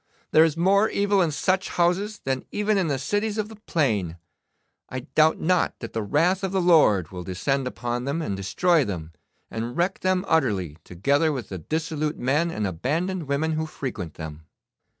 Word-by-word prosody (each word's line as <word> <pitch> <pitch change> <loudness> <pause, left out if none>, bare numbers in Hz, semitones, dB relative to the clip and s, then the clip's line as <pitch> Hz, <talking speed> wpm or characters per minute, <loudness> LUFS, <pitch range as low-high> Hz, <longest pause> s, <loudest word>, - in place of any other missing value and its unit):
'There 155 - +7
is 160 -1 +1
more 200 +5 +4
evil 200 -1 +2
in 170 - +2
such 185 +5 0
houses 185 +5 0
than 130 -1 -1
even 210 +1 +1
in 190 -4 +1
the 140 -3 0
cities 205 - -1
of 215 0 -2
the 220 - -10
plain. 115 - -1 0.7
I 130 - -4
doubt 155 +3 +2
not 180 +1 +1
that 115 - -8
the 115 - -1
wrath 170 - +1
of 190 - -1
the 195 - +1
Lord 150 - +4
will 90 -1 -6
descend 130 +9 -1
upon 120 0 -3
them, 140 +4 -1
and 105 -12 -2
destroy 160 - +2
them, 85 -8 -5 0.4
and 115 +2 -4
wreck 175 +2 0
them 185 0 +1
utterly, 100 - +1
together 140 - +1
with 130 -7 -5
the 95 - -5
dissolute 155 - -2
men 150 +7 +1
and 105 -10 -2
abandoned 155 - -2
women 145 +3 0
who 160 0 -1
frequent 110 - -6
them. 80 -1 -8
150 Hz, 185 wpm, -25 LUFS, 115-180 Hz, 0.7 s, There